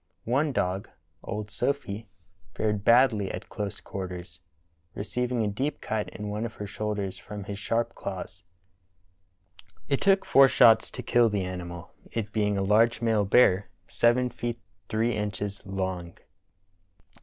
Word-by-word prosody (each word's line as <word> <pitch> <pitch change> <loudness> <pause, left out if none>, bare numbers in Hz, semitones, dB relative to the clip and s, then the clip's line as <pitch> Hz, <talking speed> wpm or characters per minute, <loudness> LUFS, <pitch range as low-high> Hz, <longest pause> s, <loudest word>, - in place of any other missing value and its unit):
One 140 +6 +1
dog, 95 -4 -1 0.3
old 105 0 -5
Sophy, 115 -4 -2 0.5
fared 105 -2 0
badl)^ 115 -4 +4
at - - -9
close 105 -3 -4
quarters, 90 -3 -7 0.6
receiving 125 +2 -1
a - - 0
deep 135 +8 -2
cut 110 -1 -2
in 105 - -7
one 105 +2 -3
of 115 -2 -5
her 105 - -5
shoulders 100 -2 -3
from 105 +2 -7
his 100 +1 -6
sharp 115 +3 -1
claws. 95 -1 -6 1.5
It 140 - 0
took 195 0 +4
four 135 0 +7
shots 115 -3 +6
to 125 - -7
kill 120 -1 +4
the 100 -2 -1
animal, 85 -2 -6 0.2
it 105 -2 -3
being 105 -2 +1
a 100 - +1
large 110 +3 +4
male 110 -3 +2
bear 100 -3 +4 0.2
seven 125 +1 +2
feet 120 0 -4 0.3
three 115 +2 +1
inches 105 -1 -3
long. 95 -3 -3
105 Hz, 145 wpm, -27 LUFS, 100-115 Hz, 1.5 s, four